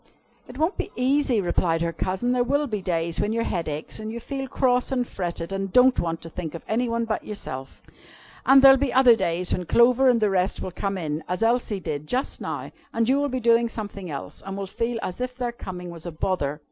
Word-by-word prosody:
"It 250 - -11
won't 320 +6 0
be - - -3
easy," 260 -2 +2
replied 170 -2 +1
her 170 0 -1
cousin. 190 +9 -1
"There 250 -1 +2
will 285 +4 +1
be 215 -7 -3
days 170 -2 -1
when 210 - 0
your 230 0 0
head 170 -6 -2
aches, 150 0 -5
and 215 0 -5
you 235 - -5
feel 270 +2 -5
cross 250 0 +1
and 250 -2 0
fretted, 175 -1 -4
and 195 0 -3
don't 250 +4 +5
want 165 -1 -2
to 165 - -8
think 165 -2 -5
of 170 - -8
any 235 +2 0
one 230 0 0
but 220 -1 -2
yourself. 135 -10 -7 0.6
And 270 0 +6
there'll 270 0 +9
be 280 -2 0
other 255 -2 +6
days 180 -3 -1
when 180 -2 -2
Clover 250 +2 +5
and 240 -2 +4
the 210 -2 +2
rest 185 0 +1
will 185 - -4
come 195 +2 -3
in, 155 -2 -3
as 180 +5 -1
Elsie 230 -3 +1
did 150 -4 -4
just 255 - -2
now, - - -5 0.2
and 230 0 0
you 265 +2 +4
will 285 0 0
be 255 0 -2
doing 235 0 +3
something 205 -5 -6
else, 140 -2 -6
and 195 0 -6
will 200 - -3
feel 230 +4 -2
as 185 +7 -4
if 250 0 -3
their 245 -2 -2
coming 180 -6 -7
was 170 0 -8
a - - -4
bother. 155 -3 -2
215 Hz, 235 wpm, -25 LUFS, 175-250 Hz, 0.6 s, there'll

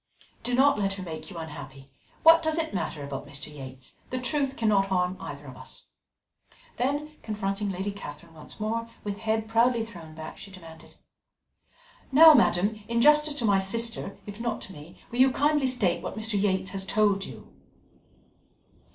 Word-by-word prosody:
Do 245 - -1
not 275 -2 +4
let 195 -1 0
her 195 -1 -6
make 160 -2 -7
you 180 - -9
unhappy. 135 -4 -9 0.4
What 330 +1 +8
does 315 0 0
it 325 -1 -2
matter 160 -5 -3
about 140 0 -6
Mr. 145 +1 -7
Yates? 130 -2 -10
The 255 - -3
truth 275 +1 -1
cannot 205 -4 +2
harm 180 -1 0
either - - -8
of - - -10
us." - - -11 0.9
Then, 290 +4 -1
confronting 205 -1 -3
Lady 190 +2 -3
Catherine 165 -4 -10
once 155 +5 -13
more, 230 +2 -2
with 205 -1 -4
head 220 0 -1
proudly 230 +1 +2
thrown 170 -8 -12
back, 155 0 -8
she 200 - -9
demanded: 165 -4 -13 1.2
"Now, 315 +3 +9
madam, 210 -3 +3
in 235 0 0
justice 300 +3 +5
to 245 - +1
my 200 -2 +4
sister, 225 +1 0
if 205 +1 -9
not 235 -2 -2
to 190 - -6
me, 150 +1 -12 0.2
will 240 - -4
you 260 +1 +7
kindly 295 0 +2
state 220 -9 +1
what - - -6
Mr. 220 +1 -1
Yates 195 -2 +1
has 195 -1 -3
told 200 -1 +2
you?" - - -11
205 Hz, 175 wpm, -27 LUFS, 175-240 Hz, 1.2 s, Now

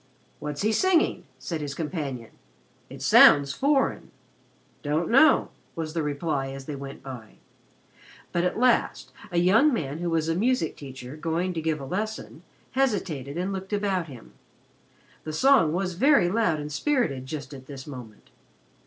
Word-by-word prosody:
"What's 150 +3 -4
he 215 - +2
singing?" 345 - +2
said 165 -3 -5
his 140 -2 -5
companion. 145 -8 -5 0.6
"It - - -9
sounds 140 -1 +7
foreign." 275 - 0 0.7
"Don't 155 +5 -1
know," 275 +4 +5 0.3
was 160 -2 -4
the 165 - -1
reply 145 -1 -2
as 135 0 -8
they 150 - -5
went 140 0 -9
by. 125 -5 -9 1.0
But 175 - 0
at 180 - -1
last 250 +1 +1 0.2
a 175 - -2
young 210 - +5
man 150 - -3
who 175 0 -2
was 165 -1 0
a 165 - +1
music 215 -2 0
teacher, 130 -1 -9
going 165 +3 -2
to 165 - -3
give 160 -1 -1
a 135 - -7
lesson, 215 +9 -5 0.3
hesitated 180 - -1
and 185 +3 -2
looked 190 +1 -6
about 195 -4 0
him. 125 -6 -13 0.9
The 155 - -6
song 265 - +4
was 180 +2 -2
very 220 - +4
loud 185 -6 +1
and 150 0 -6
spirited 155 - -1
just 140 -1 -6
at 130 -1 -11
this 135 -2 -9
moment. 125 -7 -11
160 Hz, 160 wpm, -26 LUFS, 140-200 Hz, 1.0 s, sounds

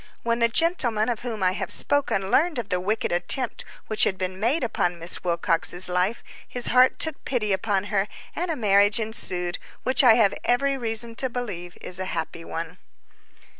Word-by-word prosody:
When 235 0 0
the 235 - +4
gentleman 240 -6 +2
of 235 -3 -2
whom 225 -5 -4
I 185 - +3
have 185 - -4
spoken 270 -9 +1
learned 325 +1 +2
of 230 -4 -4
the 180 -1 0
wicked 215 +4 -1
attempt 180 +9 0 0.2
which 215 - +2
had 190 - +1
been 185 0 -4
made 250 +9 0
upon 175 -7 -1
Miss 170 +1 -1
Wilcox's 175 0 +2
life, 180 +5 -1 0.2
his 245 -1 -3
heart 255 +1 +5
took 320 - -1
pity 215 -6 -1
upon 195 0 0
her, 195 0 +1 0.3
and 355 +1 -3
a 325 - -1
marriage 205 -2 +3
ensued, 180 -5 -3 0.2
which 260 +1 +3
I 235 -3 +7
have 220 -4 +3
every 275 +3 +1
reason 230 -2 +1
to 260 - -1
believe 200 -8 -6
is 180 - -6
a 185 - -3
happy 165 +1 -5
one. 165 +2 -7
215 Hz, 185 wpm, -24 LUFS, 185-245 Hz, 0.3 s, I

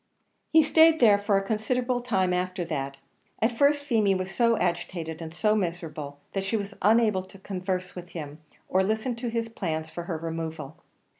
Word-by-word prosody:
He 320 0 +7
stayed 320 +1 +5
there 210 -4 +6
for 205 -1 +2
a 195 - 0
considerable 245 +4 0
time 190 -7 +1
after 180 0 -1
that; 140 -4 -3 0.4
at 230 +2 +1
first 285 +3 +3
Feemy 220 -8 +2
was 185 0 -3
so 230 0 +3
agitated 170 -2 -2
and 160 -1 -6
so 210 +5 +2
miserable, 165 -7 -3 0.2
that 195 - -1
she 195 +4 0
was 200 -1 -5
unable 215 -1 +4
to 190 +1 -14
converse 185 -1 -3
with 180 -1 -8
him, 150 -2 -7 0.3
or 190 - +2
listen 220 +5 0
to 240 +1 -4
his 230 0 -1
plans 160 -8 -4
for 175 - -6
her 170 -2 -3
removal. 160 -2 -5
190 Hz, 180 wpm, -27 LUFS, 170-225 Hz, 0.4 s, He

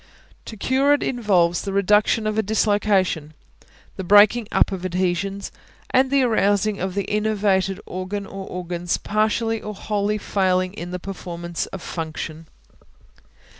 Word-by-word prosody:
To 220 - -8
cure 265 +6 +2
it - - -3
involves 185 -8 +2
the 200 - -4
reduction 210 +3 +3
of 215 0 -1
a 220 - +2
dislocation; 205 -7 +1 0.6
the 190 - -4
breaking 205 +4 +5
up - - +3
of 190 -2 -5
adhesions, 185 +2 -2 0.4
and 260 +1 +3
the 275 -1 +3
arousing 205 -3 +2
of 190 0 -3
the 200 - -2
enervated 205 -3 +1
organ 185 +2 -5
or 195 0 -8
organs 175 -1 -3
partially 220 +1 0
or 210 0 -6
wholly 210 +1 -1
failing 185 -2 0
in 175 -4 -7
the 180 - -4
performance 175 -2 -5
of 190 - -8
function. 160 -1 -6
200 Hz, 140 wpm, -22 LUFS, 180-215 Hz, 0.6 s, breaking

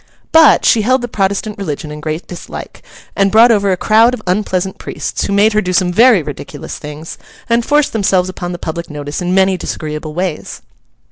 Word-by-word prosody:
But, 320 -2 +6
she 225 - +4
held 255 +3 +1
the - - -2
Protestant 200 0 -2
religion 155 -4 -5
in 150 - -7
great 155 +2 -4
dislike, 175 - -9 0.3
and 195 0 +2
brought 230 +2 +6
over 200 -3 +2
a 185 - 0
crowd 225 +6 +3
of - - -12
unpleasant 185 0 -1
priests, - - -4
who - - -3
made 205 +2 +3
her 215 - +2
do 185 -2 -3
some 180 -1 +1
very 230 -3 +5
ridiculous 140 -1 -8
things, 150 +2 -9 0.3
and 235 0 +2
forced 295 +3 +1
themselves 190 -4 +1
upon 175 -1 -5
the 175 - -5
public 170 0 -6
notice 145 +1 -5
in 180 +1 -1
many 190 -1 +3
disagreeable 155 -2 -5
ways. 180 -3 -4
190 Hz, 195 wpm, -15 LUFS, 165-215 Hz, 0.3 s, But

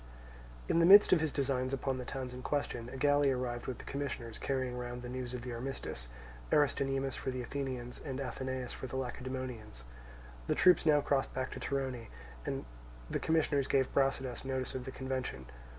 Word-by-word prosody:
In 165 - +3
the 165 - +6
midst 200 +1 +10
of 170 - +5
his 160 -2 +1
designs 130 -2 0
upon 135 -1 -1
the 125 - -5
towns 130 -1 -4
in 125 - -7
question, 125 -4 -2
a 130 - -7
galley 145 +1 +4
arrived 125 -2 -2
with 130 - -3
the - - -10
commissioners 135 -5 -4
carrying 130 -2 -1
round 125 0 -5
the 125 - -5
news 125 0 -4
of 120 - -5
the 125 -1 -4
armistice, 120 - -4 0.4
Aristonymus 135 -2 +2
for - - -3
the 130 -1 -3
Athenians 130 -2 -4
and 135 -3 -4
Athenaeus 130 -1 -3
for 130 - -6
the 130 - -6
Lacedaemonians. 125 - -5 0.6
The - - +2
troops 180 -2 +6
now 150 -1 +6
crossed 140 -1 0
back 130 0 -2
to - - -6
Torone, 130 -4 -2 0.4
and - - -2 0.5
the - - 0
commissioners 150 -4 +2
gave 135 -2 +2
Brasidas 135 -2 +1
notice 130 -1 -2
of 130 -1 -4
the 130 - -5
convention. 130 - -3
130 Hz, 185 wpm, -33 LUFS, 125-140 Hz, 0.6 s, midst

